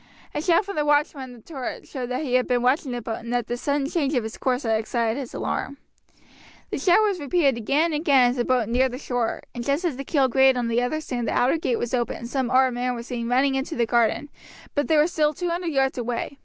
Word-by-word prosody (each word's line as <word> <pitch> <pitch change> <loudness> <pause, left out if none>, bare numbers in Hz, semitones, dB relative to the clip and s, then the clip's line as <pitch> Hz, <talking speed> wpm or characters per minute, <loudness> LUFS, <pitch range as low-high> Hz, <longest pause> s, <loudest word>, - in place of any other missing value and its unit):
A - - -2
shout 345 +4 +3
from 400 -3 -6
the 300 - +2
watchman 295 -1 +1
on 250 - -11
the 240 - -14
turret 270 -1 -6
showed 255 -3 -5
that 255 +4 -2
he 255 -4 -3
had 255 0 +3
been 245 -1 +1
watching 260 +2 +1
the 240 -1 -4
boat 225 0 -4
and 235 - -7
that 245 -2 0
this 240 +1 -4
sudden 280 -1 0
change 295 -2 0
of 240 -3 0
its 220 - -6
course 255 0 -1
had 225 -2 +1
excited 230 +2 -1
his 260 -4 -6
alarm. 280 - -3 0.9
The - - -2
shout 370 +4 +4
was 405 -4 0
repeated 285 -2 +2
again 290 +8 +1
and 300 - -1
again 270 -6 +4
as 255 - -5
the 240 - +1
boat 245 -3 +1
neared 250 +2 +1
the - - -4
shore, 245 -4 -2
and 240 - -5
just 285 +7 0
as 305 -7 -1
the 275 - -4
keel 275 -1 +2
grated 265 +1 +4
on 240 -1 -1
the 245 +6 0
sand 245 -6 -3
the - - -1
outer 255 +6 +2
gate 250 -6 0
was 240 - -3
opened 240 -2 -1
and 235 - -7
some 260 -1 -1
armed 255 0 +4
men 250 +1 -1
were 235 - -6
seen 235 -1 -4
running 265 +2 +3
into 270 +4 -2
the 235 - +1
garden, 235 +5 +1 0.4
but 290 -1 0
they 315 - +3
were 300 - +5
still 305 -3 +1
two 355 +2 -2
hundred 345 +1 -2
yards 270 -2 +1
away. 245 +3 -4
260 Hz, 265 wpm, -24 LUFS, 240-290 Hz, 0.9 s, were